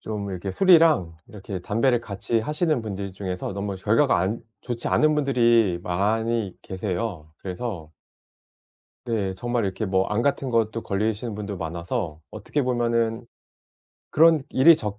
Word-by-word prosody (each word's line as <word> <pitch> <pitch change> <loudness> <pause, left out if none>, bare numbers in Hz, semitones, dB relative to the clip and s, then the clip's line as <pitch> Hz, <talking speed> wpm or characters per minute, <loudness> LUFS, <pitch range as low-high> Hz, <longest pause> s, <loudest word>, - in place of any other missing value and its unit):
좀 105 -2 -4
이렇게 95 +1 -4
술이랑 160 - +4
이렇게 100 -4 -7
담배를 115 +6 +1
같이 115 +1 -2
하시는 150 0 0
분들 100 -2 -5
중에서 95 -1 -4
너무 100 0 -3
결과가 115 +8 +3
안 95 +6 -1 0.2
좋지 120 -1 -3
않은 155 0 +3
분들이 120 -9 +3
많이 110 +3 0
계세요. 95 -4 -4
그래서 95 -4 -5 1.2
네, 100 -5 -1
정말 120 +3 -1
이렇게 100 +3 -2
뭐 95 0 +2
암 105 +2 0
같은 140 0 0
것도 115 -1 0
걸리시는 110 +3 -2
분도 105 -1 -5
많아서 85 -2 -4
어떻게 145 - -2
보면은 115 -2 0 0.9
그런 160 -1 +5
일이 145 +6 +6
적 105 -7 -5
110 Hz, 305 characters per minute, -24 LUFS, 95-120 Hz, 1.2 s, 일이